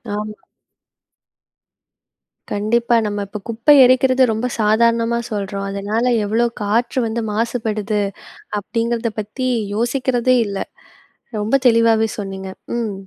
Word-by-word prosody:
ஆமா. 210 0 -4 2.2
கண்டிப்பா 235 +3 +1
நம்ம 205 -1 -2
இப்ப 210 +2 -7
குப்பை 230 +6 +4
எரிக்கிறது 255 +1 +4
ரொம்ப 220 +2 -2
சாதாரணமா 230 +2 +2
சொல்றோம். 200 -1 -3
அதனால 205 +4 -1 0.2
எவ்வளோ 225 +4 +1 0.2
காற்று 235 +5 0
வந்து 225 +1 -2
மாசுபடுது 215 -2 -1 0.6
அப்படிங்கிறத 230 +2 -2
பத்தி 215 +5 -4 0.3
யோசிக்கிறதே 250 +2 +1
இல்ல. 200 -1 -4 0.8
ரொம்ப 210 +5 +1
தெளிவாவே 230 -1 +4
சொன்னீங்க. 195 -1 -6 0.3
ம். 225 -3 -2
225 Hz, 100 wpm, -19 LUFS, 210-235 Hz, 2.2 s, குப்பை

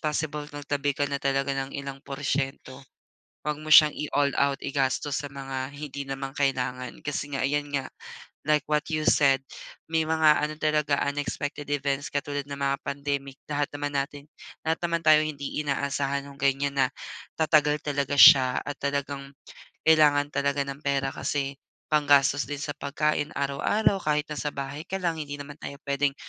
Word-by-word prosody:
possible 150 -1 -2
magtabi 145 -1 -2
ka 145 - +1
na 140 0 -3
talaga 140 0 0
ng 135 0 -4
ilang 140 -1 -6
porsiyento. 135 -1 -3 0.7
Huwag 150 -1 -1
mo 155 - -7
siyang 150 -1 +9
i-all-out 140 -1 +1
igastos 140 +1 -1
sa 145 - -7
mga 135 -1 -5
hindi 145 -1 -6
naman 135 0 -5
kailangan. 125 -3 -1
Kasi 145 0 -4
nga 135 -1 0
ayan 145 +1 -1
nga, 135 -2 -1 0.6
like 150 -1 +3
what 150 0 +2
you 155 -1 -1
said, 135 -2 +4 0.5
may 160 -1 +2
mga 160 -1 +4
ano 150 +1 -2
talaga, 150 -2 +1 0.2
unexpected 145 0 -4
events 140 -1 -1
katulad 145 +1 -2
ng 140 - -4
mga 140 0 +1
pandemic. 140 -1 -3 0.2
Lahat 145 0 0
naman 145 0 -3
natin 140 +1 -5 0.4
lahat 160 +1 +1
naman 170 -1 0
tayo 155 -1 +7
hindi 145 -1 -4
inaasahan 140 0 -1
nung 140 -1 -13
ganiyan 140 0 +1
na 130 - +5 0.5
tatagal 150 -1 +3
talaga 145 -1 -1
siya 130 -2 +8
at 145 - -5
talagang 140 -1 -3 0.6
kailangan 150 -2 +5
talaga 140 0 +1
ng 140 +1 -6
pera 135 -1 0
kasi 140 -1 -2 0.3
panggastos 145 -2 +4
din 145 - -3
sa 145 -1 -4
pagkain 150 +1 -1
araw-araw 175 +8 +1
kahit 150 0 +1
na 150 - -4
sa 150 - -2
bahay 140 +2 -5
ka 195 - -3
lang, 170 -3 0
hindi 145 -1 -5
naman 145 0 -8
tayo 140 - -7
puwedeng 140 0 +1
145 Hz, 165 wpm, -26 LUFS, 140-150 Hz, 0.7 s, siyang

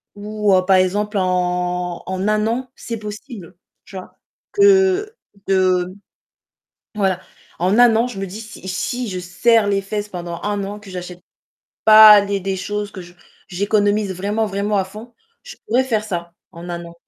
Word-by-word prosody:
ou, 210 -1 -1
heu, 185 - +2
par 190 0 +4
exemple 205 +3 0
en 180 -1 -1
en 190 +2 -3
1 215 0 +1
an, 250 +2 -3
c'est 230 - -6
possible, 210 - -9 0.3
tu 195 - -10
vois? 185 - -11 0.4
Que 400 +1 +3 0.3
de 185 -1 +1 1.0
voilà, 190 -3 0 0.4
en 185 +6 +2
1 240 -2 +6
an, 230 +2 +2
je 235 -6 -8
me 195 - -3
dis 210 +5 -8
si 215 -3 -11
si 245 +6 -3
je 185 -1 -4
serre 205 +5 +2
les 200 -1 +1
fesses 205 +1 -4
pendant 175 -2 -6
1 205 -1 -2
an, 205 +1 -7
que 205 -1 -14
j'achète 180 -1 -8 0.6
pas 215 -1 +9
les 200 0 -2
des 195 0 -3
choses, 205 +2 -4
que 190 - -8
je 175 0 -15 0.3
j'économise 205 +1 0
vraiment, 205 +4 -2
vraiment 205 +1 -1
à 190 - +1
fond, 215 +5 -12 0.3
je - - -11
pourrais 255 +3 +2
faire 220 -5 -1
ça 170 -5 -5 0.2
en 170 +1 -10
1 175 0 -5
an, 170 0 -12
200 Hz, 175 wpm, -19 LUFS, 185-215 Hz, 1.0 s, pas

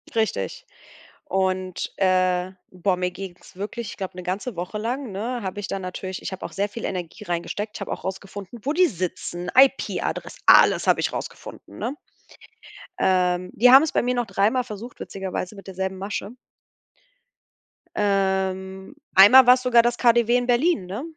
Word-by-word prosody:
Richtig. 230 - -1 0.6
Und, 185 -6 -2
äh 185 -1 +2 0.2
boah, 185 0 0
mir 180 0 -1
ging's 180 -1 -10
wirklich 210 +3 -5
ich - - -11
glaube, 185 -2 -6
'ne 180 - -6
ganze 195 +6 -4
Woche 180 +5 -4
lang, 240 +3 -3
ne, 235 +5 -3
habe 190 +1 -4
ich 200 - -5
da 195 - -2
natürlich 185 0 -6
ich - - -5
habe 190 - -7
auch - - -7
sehr 200 +1 -1
viel 230 +2 -8
Energie 180 +2 -5
reingesteckt. 205 +4 -4
Ich - - -12
habe 200 - -5
auch - - -9
rausgefunden, 195 +3 -7
wo 285 - -1
die 360 +2 +4
sitzen, 180 - -4
IP-Adress 270 +1 +2
alles - - +6
habe - - +4
ich - - -1
rausgefunden, - - -8
ne? 260 - -3 1.0
Ähm, 180 -1 +1
die 245 +3 +5
haben 265 +3 +9
es 320 - -1
bei - - +2
mir 250 +1 0
noch 245 -1 -1
dreimal 225 +5 +1
versucht 230 +1 -9
witzigerweise 190 0 -5
mit 195 - -12
derselben 190 0 -4
Masche. 200 +2 -5 1.6
Ähm, 190 +1 -1 0.2
einmal 230 +7 +9
war's 250 +1 +7
sogar 245 -2 +5
das 240 +1 0
KaDeWe 235 -1 +3
in 245 0 -2
Berlin, 245 - +2
ne? 200 +8 -5
195 Hz, 170 wpm, -23 LUFS, 185-240 Hz, 1.6 s, haben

